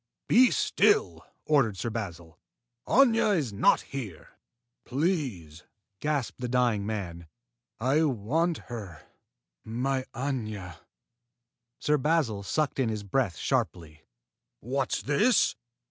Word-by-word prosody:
"Be 250 +2 +6
still!" 420 +2 +2 0.2
ordered 135 -10 +2
Sir 115 - -3
Basil. 85 -7 -6 0.5
"Aña 230 -5 +4
is 130 -10 -2
not 100 - +4
here." 115 - -7 0.5
"Please!" 125 - -2 0.4
gasped 145 -5 -2
the 125 - -1
dying 120 -5 +1
man. 85 -6 -5 0.5
"I 135 +7 +2
want 150 - 0
her 100 -10 -8 0.6
my 130 +4 -2
Aña!" 110 - -4 1.0
Sir 150 0 +1
Basil 140 -8 +1
sucked 145 +8 -1
in 125 -4 +2
his 105 -2 -3
breath 100 -4 0
sharply. 80 -2 -2 0.6
"What's 130 +3 -2
this? 210 - +3
125 Hz, 105 wpm, -28 LUFS, 100-150 Hz, 1.0 s, Be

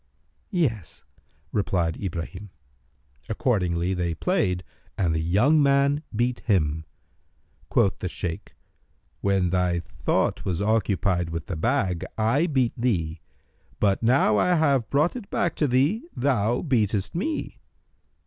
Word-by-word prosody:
"Yes," 125 - -2 0.5
replied 90 -5 0
Ibrahim. 95 +2 -5 0.8
Accordingly 90 -6 0
they 85 -2 -1
played 90 - 0 0.3
and 85 -4 +1
the 80 - 0
young 110 - +3
man 140 +1 +3
beat 120 +2 0
him. 80 -8 0 0.8
Quoth 95 - +2
the 90 - -3
Shaykh, 85 -1 -5 0.6
"When 95 -3 +1
thy 90 -1 +1
thought - - -1
was 90 -2 -2
occupied 100 -4 +1
with 85 -1 -4
the 90 - -4
bag, 95 - 0
I 120 +10 +2
beat 130 -7 +1
thee: 85 -10 -1 0.6
but, 100 -2 +2
now 115 -2 +3
I 180 - +3
have 140 -7 +2
brought 150 - +2
it 235 -5 -7
back 170 - 0
to 150 - +2
thee, 140 - +1
thou 120 -3 +1
beatest 105 - 0
me. 295 - -3
105 Hz, 125 wpm, -25 LUFS, 90-135 Hz, 0.8 s, young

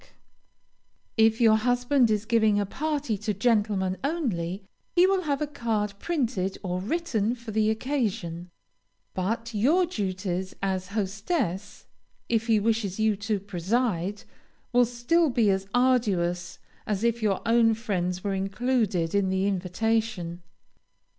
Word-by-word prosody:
_ - - -22 1.1
If 225 0 +4
your 220 -2 +6
husband 245 +2 +2
is 210 0 0
giving 220 -2 +3
a 205 - 0
party 285 -2 -2
to 210 0 -2
gentlemen 205 -4 +1
only, 200 - -2 0.3
he 355 +1 +6
will 385 0 +2
have 290 0 0
a - - +1
card 225 -8 -2
printed 235 - -1
or 180 -1 -2
written 235 - -1
for 235 -2 -9
the 215 0 +2
occasion, 215 - -2 0.6
but 230 +5 -2
your 295 - +3
duties 190 - -3
as 190 -1 -2
hostess, 205 - -2 0.4
if 225 -1 +1
he 220 -2 +4
wishes 215 -2 0
you 220 -1 +3
to 205 0 -1
preside, 200 0 -1 0.5
will 245 0 +5
still 245 +8 +1
be 230 -5 +3
as 190 0 -1
arduous 200 -9 +1 0.3
as 210 0 -1
if 235 0 +1
your 205 -3 +1
own 230 -1 +4
friends 185 -5 -2
were 200 -1 -1
included 195 -3 0
in 200 -2 +2
the 190 +1 0
invitation. 195 -1 -1
215 Hz, 135 wpm, -26 LUFS, 190-240 Hz, 1.1 s, your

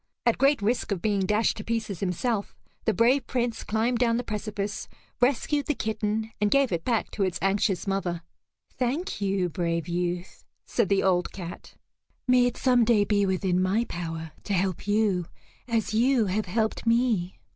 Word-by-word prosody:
At 235 - +2
great 275 -4 +3
risk 230 +1 0
of 195 - 0
being 200 0 0
dashed 210 +2 +2
to 210 - -5
pieces 220 -5 -2
himself, 200 +3 -1 0.3
the 220 - +4
brave 245 +3 +3
Prince 240 -3 -1
climbed 225 +3 0
down 235 -2 +3
the 245 - -2
precipice, 210 -1 -4 0.3
rescued 280 +3 +1
the 300 - +1
kitten, 220 0 -2
and 210 - +3
gave 275 +1 +3
it 165 -2 -1
back 235 -3 0
to 205 - -1
its 185 -2 0
anxious 195 -1 +1
mother. 185 -4 -2 0.6
"Thank 265 - -1
you, 195 -2 +1
brave 170 -1 -2
youth," 175 +1 -3 0.2
said 230 -6 0
the 195 -1 +3
old 180 -2 +2
cat. 175 -2 -9 0.5
"May 250 -1 +5
it 245 - -3
some 250 -2 +4
day 220 -3 +4
be 205 -1 +2
within 185 -1 +1
my 195 +5 +2
power 165 -3 -5
to 205 - -2
help 185 +1 -1
you 205 -5 +1 0.4
as 225 -2 0
you 240 +1 +3
have 200 +2 -1
helped 220 +4 -1
me." 230 -6 +2
210 Hz, 175 wpm, -27 LUFS, 185-235 Hz, 0.6 s, May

